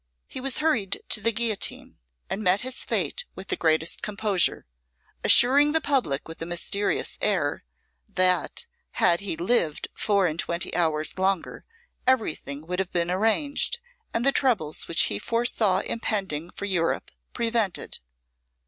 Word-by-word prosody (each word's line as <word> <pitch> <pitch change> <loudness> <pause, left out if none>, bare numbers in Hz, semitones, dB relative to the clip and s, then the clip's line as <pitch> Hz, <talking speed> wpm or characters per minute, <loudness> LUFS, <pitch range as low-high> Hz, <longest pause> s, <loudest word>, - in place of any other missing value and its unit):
He 260 - -7
was 270 -1 -1
hurried 240 -12 0
to 210 - +3
the 230 - +3
guillotine, 225 -2 -1 0.3
and 205 - -3
met 190 0 +3
his 255 +1 -2
fate - - -1
with 190 +1 -10
the - - +1
greatest 160 0 +1
composure, 205 -3 0 0.6
assuring 285 +5 +6
the 320 - +4
public 260 - 0
with 160 0 -10
a - - -2
mysterious 185 +4 0
air, 175 -9 0 0.5
that 185 0 +1 0.3
had 170 -1 +3
he 200 -5 -3
lived 175 -5 0
four 200 -3 +1
and 165 -1 -2
twenty 170 +1 -1
hours 160 0 0
longer 190 -2 -1 0.4
everything 155 - 0
would 180 +2 -3
have 190 -1 -2
been 175 0 0
arranged, 225 - +1 0.3
and 230 +2 -1
the 275 - +5
troubles 220 - 0
which 165 - +3
he 100 - 0
foresaw 230 - +1
impending 190 -8 -2
for 200 - -6
Europe 175 -4 -1 0.2
prevented. 230 -5 -1
195 Hz, 145 wpm, -25 LUFS, 170-235 Hz, 0.6 s, assuring